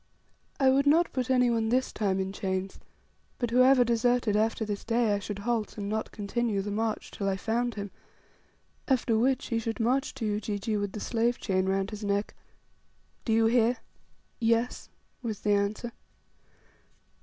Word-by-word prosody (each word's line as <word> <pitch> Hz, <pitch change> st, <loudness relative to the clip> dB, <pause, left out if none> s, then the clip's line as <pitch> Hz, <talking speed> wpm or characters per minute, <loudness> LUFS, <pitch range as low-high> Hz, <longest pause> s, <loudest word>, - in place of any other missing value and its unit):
I 265 Hz, -1 st, +5 dB
would 275 Hz, +2 st, +3 dB
not 330 Hz, +4 st, +4 dB
put 255 Hz, -1 st, -2 dB
any 250 Hz, -2 st, +4 dB
one 225 Hz, -1 st, +1 dB
this 255 Hz, +2 st, +1 dB
time 195 Hz, -3 st, 0 dB
in 190 Hz, 0 st, -2 dB
chains; 190 Hz, -1 st, -3 dB, 0.6 s
but 240 Hz, -2 st, -2 dB
whoever 255 Hz, +1 st, +6 dB
deserted 235 Hz, -1 st, +2 dB
after 220 Hz, +1 st, +1 dB
this 205 Hz, -1 st, -4 dB
day, 230 Hz, -2 st, +2 dB
I 205 Hz, -, 0 dB
should 205 Hz, 0 st, -5 dB
halt, 220 Hz, +1 st, -2 dB
and 200 Hz, -1 st, -4 dB
not 220 Hz, +1 st, -2 dB
continue 205 Hz, 0 st, -1 dB
the 205 Hz, -, -4 dB
march 220 Hz, +1 st, -2 dB
till 195 Hz, -1 st, -2 dB
I 190 Hz, -, -1 dB
found 235 Hz, +4 st, -1 dB
him, 200 Hz, -2 st, -5 dB, 1.0 s
after 250 Hz, -4 st, +2 dB
which 260 Hz, +4 st, +1 dB
he 230 Hz, -2 st, +1 dB
should 225 Hz, +1 st, -4 dB
march 250 Hz, +4 st, +1 dB
to 230 Hz, -, -4 dB
Ujiji 210 Hz, +1 st, -2 dB
with 205 Hz, -1 st, -2 dB
the 215 Hz, -, -5 dB
slave 235 Hz, +2 st, 0 dB
chain 185 Hz, -2 st, 0 dB
round 195 Hz, +2 st, 0 dB
his 210 Hz, 0 st, -7 dB
neck. 200 Hz, 0 st, -1 dB, 0.9 s
"Do 230 Hz, -, 0 dB
you 225 Hz, 0 st, +4 dB
hear?" 235 Hz, +1 st, +3 dB, 0.6 s
"Yes," 230 Hz, +1 st, 0 dB, 0.3 s
was 220 Hz, -4 st, -4 dB
the 210 Hz, -, +1 dB
answer. 205 Hz, +4 st, -1 dB
225 Hz, 170 wpm, -28 LUFS, 205-240 Hz, 1.0 s, whoever